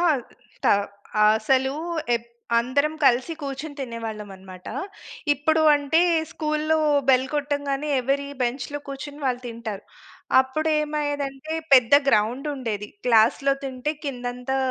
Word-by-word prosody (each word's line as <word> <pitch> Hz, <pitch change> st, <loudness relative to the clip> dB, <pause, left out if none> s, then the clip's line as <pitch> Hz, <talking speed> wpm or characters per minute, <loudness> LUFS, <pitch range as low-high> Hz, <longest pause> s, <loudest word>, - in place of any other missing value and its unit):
ఆ! -, -, +1 dB, 0.5 s
స్టా -, -, +3 dB, 0.6 s
అసలు 265 Hz, +4 st, +1 dB, 0.4 s
ఎప్ 235 Hz, 0 st, -11 dB, 0.3 s
అందరం 285 Hz, +6 st, +1 dB
కలిసి 255 Hz, +6 st, +3 dB
కూర్చొని 285 Hz, +1 st, -5 dB
తినేవాళ్ళం 225 Hz, -4 st, -5 dB
అన్నమాట. 185 Hz, -1 st, -12 dB, 0.6 s
ఇప్పుడు 315 Hz, +3 st, +1 dB
అంటే, 290 Hz, +3 st, +2 dB, 0.3 s
స్కూల్‌లో 310 Hz, 0 st, 0 dB, 0.3 s
బెల్ 260 Hz, 0 st, +5 dB
కొట్టంగానే, 285 Hz, 0 st, -1 dB
ఎవరి 275 Hz, +3 st, 0 dB, 0.2 s
బెంచ్‌లో 250 Hz, +4 st, -2 dB
కూర్చొని 285 Hz, +2 st, -7 dB
వాళ్ళు 250 Hz, -1 st, 0 dB
తింటారు. 225 Hz, -3 st, -6 dB, 0.6 s
అప్పుడు 310 Hz, +5 st, -1 dB
ఏమయ్యేది 295 Hz, -1 st, -1 dB
అంటే, 275 Hz, +4 st, -8 dB, 0.2 s
పెద్ద 250 Hz, -1 st, +6 dB, 0.2 s
గ్రౌండ్ 240 Hz, +6 st, +2 dB
ఉండేది. 215 Hz, -6 st, -4 dB, 0.2 s
క్లాస్‌లో 235 Hz, +4 st, +4 dB
తింటే 265 Hz, +3 st, -3 dB
కిందంతా 250 Hz, 0 st, -3 dB
270 Hz, 115 wpm, -24 LUFS, 240-290 Hz, 0.6 s, పెద్ద